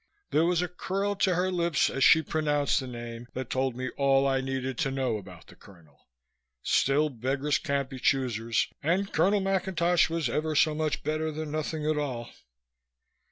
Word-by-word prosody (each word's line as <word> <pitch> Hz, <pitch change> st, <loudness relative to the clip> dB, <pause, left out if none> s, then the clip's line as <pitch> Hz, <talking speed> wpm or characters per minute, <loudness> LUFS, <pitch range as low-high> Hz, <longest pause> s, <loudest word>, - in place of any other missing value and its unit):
There 160 Hz, +2 st, +3 dB
was 175 Hz, 0 st, +2 dB
a -, -, -1 dB
curl 195 Hz, +3 st, -2 dB
to 190 Hz, -2 st, +2 dB
her 185 Hz, +2 st, 0 dB
lips 170 Hz, -3 st, +1 dB
as 135 Hz, -, -1 dB
she 160 Hz, -, +6 dB
pronounced 150 Hz, -2 st, +1 dB
the 130 Hz, -, -6 dB
name 120 Hz, -1 st, -7 dB
that 130 Hz, -2 st, -5 dB
told 130 Hz, -1 st, 0 dB
me 130 Hz, 0 st, -4 dB
all 135 Hz, -1 st, +3 dB
I 135 Hz, -1 st, +1 dB
needed 130 Hz, -1 st, -3 dB
to -, -, +1 dB
know 130 Hz, -4 st, -1 dB
about 90 Hz, -4 st, -12 dB
the -, -, -16 dB
colonel. 80 Hz, -7 st, -20 dB, 0.6 s
Still, 145 Hz, +3 st, +2 dB
beggars 135 Hz, +3 st, -1 dB
can't 140 Hz, -3 st, -1 dB
be 130 Hz, -1 st, -9 dB
choosers 115 Hz, -4 st, +1 dB
and 185 Hz, +6 st, 0 dB
Colonel 200 Hz, +2 st, +3 dB
McIntosh 180 Hz, -3 st, +1 dB
was 165 Hz, -4 st, -1 dB
ever 155 Hz, +6 st, -1 dB
so 155 Hz, +1 st, +4 dB
much 155 Hz, -1 st, -2 dB
better 155 Hz, +1 st, -1 dB
than 155 Hz, 0 st, -5 dB
nothing 155 Hz, 0 st, -3 dB
at 155 Hz, -1 st, +1 dB
all. 125 Hz, -5 st, -4 dB
145 Hz, 180 wpm, -28 LUFS, 130-160 Hz, 0.6 s, she